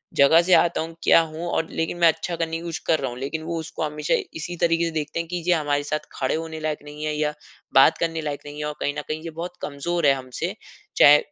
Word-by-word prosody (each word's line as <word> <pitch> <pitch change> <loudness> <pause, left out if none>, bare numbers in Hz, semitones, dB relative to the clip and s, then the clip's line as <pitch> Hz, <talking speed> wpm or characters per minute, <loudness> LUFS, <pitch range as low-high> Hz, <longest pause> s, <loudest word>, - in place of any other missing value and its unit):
जगह 150 +4 +6
से 180 +1 +2
आता 175 -2 +4
हूँ, 165 +1 -6
क्या - - +7
हूँ 160 +1 -5
और 165 - -1
लेकिन 165 +1 -2
मैं 170 - +6
अच्छा 170 +1 0
करने 165 -1 -2
की 165 - -8
कोशिश 170 0 -4
कर 160 - +3
रहा 135 - -2
हूँ। 120 - -8
लेकिन 155 +4 -4
वो 165 - -3
उसको 160 0 -5
हमेशा 150 -1 -1 0.2
इसी 160 +2 -5
तरीके 170 0 +3
से 165 - -2
देखते 155 0 -3
हैं 170 - -3
कि 180 - -4
ये 180 - +5
हमारे 145 -3 0
साथ 150 +1 -1 0.2
खड़े 130 - +1
होने 160 0 -5
लायक 155 -1 -2
नहीं 150 +1 -9
है 155 - -1
या 150 0 0 0.4
बात 135 - +6
करने 165 -1 -1
लायक 145 -2 -4
नहीं 145 0 -8
है 150 - -2
और 150 - -3
कहीं 145 - -1
न - - -1
कहीं 155 +1 -3
ये 165 - -5
बहुत 170 +2 -7
कमज़ोर 165 +4 -2
है 140 - +6
हमसे। 130 -2 -4 0.4
चाहे 145 +1 +9
160 Hz, 265 wpm, -24 LUFS, 150-165 Hz, 0.4 s, चाहे